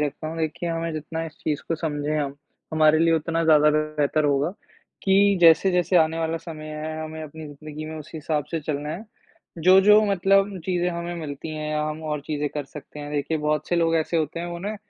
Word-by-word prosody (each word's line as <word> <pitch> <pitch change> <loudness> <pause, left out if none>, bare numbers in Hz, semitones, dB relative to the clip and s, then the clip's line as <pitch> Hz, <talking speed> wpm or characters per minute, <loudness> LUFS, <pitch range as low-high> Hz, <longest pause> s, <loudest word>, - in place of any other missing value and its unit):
रखता 150 +1 -2
हूँ 165 - -6
देखिए, 160 +2 -2
हमें 165 0 -2
जितना 160 +1 -4
इस 160 - -12
चीज़ 150 -2 -1
को 165 - +1
समझें 150 -1 -2
हम, 140 -2 -2 0.4
हमारे 155 0 +5
लिए 165 0 +4
उतना 165 +1 0
ज़्यादा 150 -1 +6
बेहतर 155 0 0
होगा 145 +2 +2 0.5
कि 200 0 +4
जैसे-जैसे 180 +1 +5
आने 160 -1 +3
वाला 165 0 -1
समय 160 -2 -8
है, 155 +1 -5
हमें 155 0 -7
अपनी 155 +1 -8
ज़िंदगी 150 +1 -8
में 155 0 -6
उस 155 +1 -10
हिसाब 155 -1 -2
से 165 -2 -2
चलना 150 0 -3
है, 175 +8 -6 0.5
जो-जो 190 +5 +7
मतलब 195 +1 +2
चीज़ें 180 -1 0
हमें 170 0 -4
मिलती 155 -2 -6
हैं 155 0 -4
या 150 0 0
हम 155 +1 -4
और 150 -1 -2
चीज़ें 150 -1 -1
कर 145 -1 -2
सकते 150 +1 -11
हैं, 145 0 -7
देखिए 150 +2 -1
बहुत 150 0 -1
से 175 - +1
लोग 165 -1 +2
ऐसे 160 +1 0
होते 160 +1 -1
हैं 175 - -4
उन्हें 175 +5 -4
155 Hz, 210 wpm, -24 LUFS, 150-170 Hz, 0.5 s, जो-जो